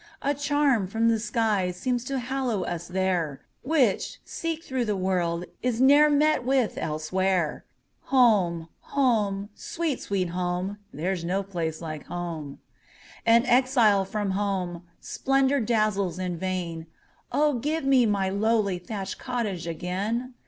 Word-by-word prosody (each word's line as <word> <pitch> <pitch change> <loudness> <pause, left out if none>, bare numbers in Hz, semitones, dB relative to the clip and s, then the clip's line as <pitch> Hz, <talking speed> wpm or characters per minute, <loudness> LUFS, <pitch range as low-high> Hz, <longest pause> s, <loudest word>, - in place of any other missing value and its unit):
A 285 - +2
charm 285 -7 +1
from 225 +4 +1
the 225 -1 +2
sky 215 -4 0
seems 235 +7 -2
to 275 +1 -2
hallow 250 -5 -1
us 175 -1 -4
there, 180 -6 -1 0.2
Which, 265 -8 +1
seek 330 -1 -4
through 260 -5 -2
the 210 -2 -1
world, 180 -2 0 0.2
is 245 -2 -1
ne'er 285 +3 +6
met 300 -1 +3
with 260 -2 +1
elsewhere. 165 +2 -1 0.4
Home! 195 -11 +3
home! 210 -7 0
sweet, 320 +3 -3
sweet 190 -3 -1
home! 180 +3 -2
There 180 +6 -2
's 170 - -6
no 190 +3 -1
place 170 -5 -4
like 155 -2 -6
home! 165 -5 -5 0.7
An 230 +2 +6
exile 245 -6 +4
from 200 0 -2
home, 190 -3 -2 0.2
splendor 270 +1 +1
dazzles 215 -5 +1
in 180 -1 -2
vain:O, 185 - -3
give 305 +3 -1
me 260 -3 +5
my 200 -2 +1
lowly 200 -1 +1
thatched 195 +1 -5
cottage 215 -9 -3
again! 200 +10 -3
205 Hz, 135 wpm, -26 LUFS, 180-250 Hz, 0.7 s, ne'er